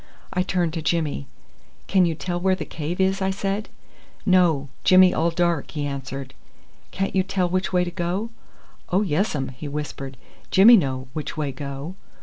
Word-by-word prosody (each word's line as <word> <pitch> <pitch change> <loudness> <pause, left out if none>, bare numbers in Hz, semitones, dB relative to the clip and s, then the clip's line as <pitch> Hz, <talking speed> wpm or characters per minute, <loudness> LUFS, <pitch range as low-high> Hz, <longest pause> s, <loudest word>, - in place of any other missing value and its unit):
I 185 - +1
turned 175 -3 0
to 165 - -3
Jimmy. 155 - -1 0.6
"Can 185 -3 +3
you 165 - -1
tell 175 +2 -3
where 190 +1 +2
the - - -5
cave 160 +3 -5
is?" 190 +1 +2
I 190 - +1
said. 195 +2 -2 0.6
"No: 175 -8 +3 0.2
Jimmy 185 0 +7
all 165 +2 +2
dark," 170 -3 0
he 150 -2 -3
answered. 135 -1 -5 0.6
"Can't 195 0 -2
you 190 - +4
tell 185 -1 0
which 185 +2 -1
way 180 -1 +3
to 175 - -4
go?" 185 +6 -2 0.6
"Oh 190 +4 +2
yes 190 +1 0
um," 135 -2 -2
he 130 +3 -8
whispered. 140 -2 -5 0.3
"Jimmy 210 +6 +8
know 130 - 0
which 155 0 -5
way 145 -3 -1
go." 140 +4 -6
175 Hz, 175 wpm, -23 LUFS, 145-185 Hz, 0.6 s, Jimmy